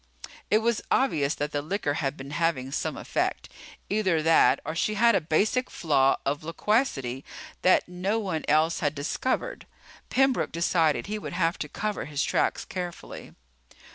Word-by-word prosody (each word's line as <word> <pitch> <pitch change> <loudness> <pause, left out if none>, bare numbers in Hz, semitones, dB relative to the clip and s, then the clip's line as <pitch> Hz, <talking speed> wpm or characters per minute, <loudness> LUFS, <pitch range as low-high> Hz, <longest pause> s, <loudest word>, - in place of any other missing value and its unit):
It 215 +1 +3
was 235 -1 +1
obvious 150 - +2
that 145 0 -3
the 145 - -1
liquor 155 -1 -2
had 140 0 -2
been 135 +1 -8
having 145 -4 0
some - - -2
effect. - - -2 0.4
Either 190 -6 +1
that, 165 0 +5
or 160 - -3
she 210 +6 0
had 235 +2 +5
a 195 - +2
basic 205 +11 +1
flaw 135 -4 +2
of 145 +2 -1
loquacity 155 - 0 0.4
that 185 - +4
no 180 +4 -1
one 185 -8 -2
else 155 +3 +3
had 150 -1 -1
discovered. 255 - -2 0.4
Pembroke 265 -1 +2
decided 165 -2 +1
he 215 +1 -4
would - - -7
have 170 -1 0
to - - -4
cover 210 -1 -3
his 145 -1 -2
tracks - - 0
carefully. 180 -2 -7
165 Hz, 160 wpm, -27 LUFS, 145-210 Hz, 0.4 s, that